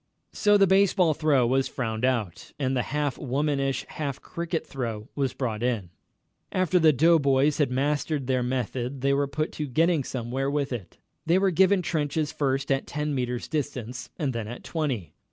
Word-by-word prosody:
So 205 Hz, 0 st, +4 dB
the 200 Hz, -, +6 dB
baseball 190 Hz, -3 st, +4 dB
throw 145 Hz, -5 st, +3 dB
was 130 Hz, +2 st, +2 dB
frowned 110 Hz, -3 st, -3 dB
out, 115 Hz, -9 st, -2 dB
and 135 Hz, -2 st, 0 dB
the 125 Hz, -, +2 dB
half 145 Hz, -1 st, -1 dB
womanish, 140 Hz, 0 st, -1 dB
half 140 Hz, -4 st, -4 dB
cricket 170 Hz, -1 st, -4 dB
throw 115 Hz, -4 st, -5 dB
was 135 Hz, -3 st, -1 dB
brought 115 Hz, -5 st, -2 dB
in. 115 Hz, -8 st, -1 dB, 0.6 s
After 185 Hz, 0 st, +2 dB
the 160 Hz, -2 st, +6 dB
doughboys 145 Hz, -1 st, +3 dB
had 145 Hz, -, +3 dB
mastered 145 Hz, +2 st, 0 dB
their 130 Hz, 0 st, +1 dB
method 125 Hz, +1 st, -2 dB
they 140 Hz, +1 st, +2 dB
were 140 Hz, 0 st, +1 dB
put 155 Hz, +3 st, -2 dB
to 150 Hz, -, -4 dB
getting 160 Hz, +3 st, +2 dB
somewhere 130 Hz, +2 st, -2 dB
with 140 Hz, -2 st, -1 dB
it. 100 Hz, -8 st, -7 dB, 0.3 s
They 170 Hz, +2 st, +4 dB
were 190 Hz, 0 st, +3 dB
given 190 Hz, +2 st, +4 dB
trenches 150 Hz, -2 st, -1 dB
first 135 Hz, -1 st, -1 dB
at 135 Hz, 0 st, 0 dB
ten 150 Hz, 0 st, -2 dB
metres' 125 Hz, -2 st, -2 dB
distance, 125 Hz, -5 st, -4 dB
and 140 Hz, -4 st, -1 dB
then 115 Hz, -2 st, -4 dB
at 120 Hz, +2 st, -8 dB
twenty. 135 Hz, -, -3 dB
140 Hz, 175 wpm, -26 LUFS, 125-155 Hz, 0.6 s, the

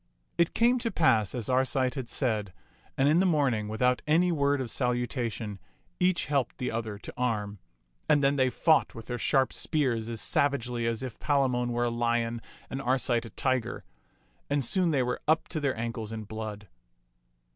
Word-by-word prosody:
It 170 Hz, -, +1 dB
came 245 Hz, +2 st, +4 dB
to 230 Hz, -, -1 dB
pass 115 Hz, -, +2 dB
as 120 Hz, -3 st, -3 dB
Arcite 130 Hz, 0 st, +1 dB
had 130 Hz, -4 st, -5 dB
said, 110 Hz, -8 st, -1 dB, 0.4 s
and 135 Hz, -, +3 dB
in 155 Hz, +4 st, +4 dB
the 190 Hz, -, +3 dB
morn 145 Hz, -7 st, +2 dB
ing, 105 Hz, -1 st, -3 dB
without 125 Hz, +4 st, +1 dB
any 175 Hz, +4 st, +3 dB
word 140 Hz, -3 st, +1 dB
of 125 Hz, -4 st, -3 dB
salutation, 120 Hz, -4 st, -2 dB, 0.4 s
each 180 Hz, -1 st, +2 dB
helped 140 Hz, -4 st, -1 dB
the 125 Hz, -, -2 dB
other 110 Hz, -2 st, -3 dB
to -, -, -10 dB
arm; 105 Hz, -5 st, -2 dB, 0.5 s
and 145 Hz, -1 st, +4 dB
then 140 Hz, +1 st, +3 dB
they 130 Hz, -2 st, +3 dB
fought 160 Hz, +5 st, +2 dB
with 115 Hz, -, -8 dB
their 120 Hz, -1 st, -4 dB
sharp 135 Hz, +1 st, +2 dB
spears 120 Hz, -7 st, 0 dB
as 115 Hz, -1 st, -3 dB
savagely 125 Hz, 0 st, +1 dB
as 115 Hz, +1 st, -2 dB
if 125 Hz, -4 st, -7 dB
Palamon 130 Hz, -4 st, +1 dB
were 120 Hz, 0 st, 0 dB
a 120 Hz, -, 0 dB
lion 115 Hz, 0 st, 0 dB, 0.3 s
and 135 Hz, -, -5 dB
Arcite 125 Hz, -2 st, +1 dB
a -, -, -10 dB
tiger; 130 Hz, -2 st, -1 dB, 0.7 s
and 140 Hz, -2 st, +1 dB
soon 180 Hz, +8 st, +2 dB
they 140 Hz, -5 st, +2 dB
were 125 Hz, 0 st, -2 dB
up 160 Hz, +1 st, +2 dB
to 160 Hz, -, -3 dB
their 140 Hz, -5 st, -1 dB
ankles 115 Hz, -1 st, -4 dB
in 110 Hz, -1 st, -5 dB
blood. 105 Hz, -1 st, -6 dB
125 Hz, 185 wpm, -28 LUFS, 115-140 Hz, 0.7 s, came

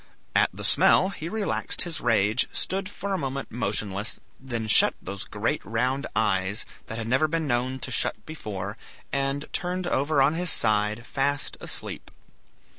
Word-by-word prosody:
At -, -, +5 dB
the -, -, -8 dB
smell 185 Hz, -, +5 dB
he 165 Hz, -4 st, -6 dB
relaxed 215 Hz, 0 st, +1 dB
his 170 Hz, -2 st, -3 dB
rage, 110 Hz, 0 st, +3 dB
stood 190 Hz, 0 st, -2 dB
for 200 Hz, 0 st, -4 dB
a 190 Hz, -, 0 dB
moment 135 Hz, -1 st, -4 dB
motionless, 105 Hz, -2 st, -1 dB, 0.2 s
then 120 Hz, -4 st, -4 dB
shut -, -, +5 dB
those 100 Hz, +2 st, -5 dB
great 105 Hz, +2 st, -2 dB
round 125 Hz, +5 st, -1 dB
eyes, 100 Hz, -1 st, +1 dB, 0.2 s
that 110 Hz, -, -5 dB
had 115 Hz, -1 st, -4 dB
never 130 Hz, +6 st, +3 dB
been 165 Hz, 0 st, -1 dB
known 130 Hz, 0 st, 0 dB
to -, -, -5 dB
shut -, -, 0 dB
before, 105 Hz, -9 st, -6 dB, 0.4 s
and 140 Hz, +1 st, 0 dB
turned 180 Hz, +1 st, -2 dB
over 145 Hz, -2 st, +1 dB
on 135 Hz, +3 st, +5 dB
his 175 Hz, +1 st, +1 dB
side, 105 Hz, -1 st, +3 dB
fast 140 Hz, +2 st, -1 dB
asleep. -, -, -5 dB
130 Hz, 160 wpm, -26 LUFS, 110-155 Hz, 0.4 s, At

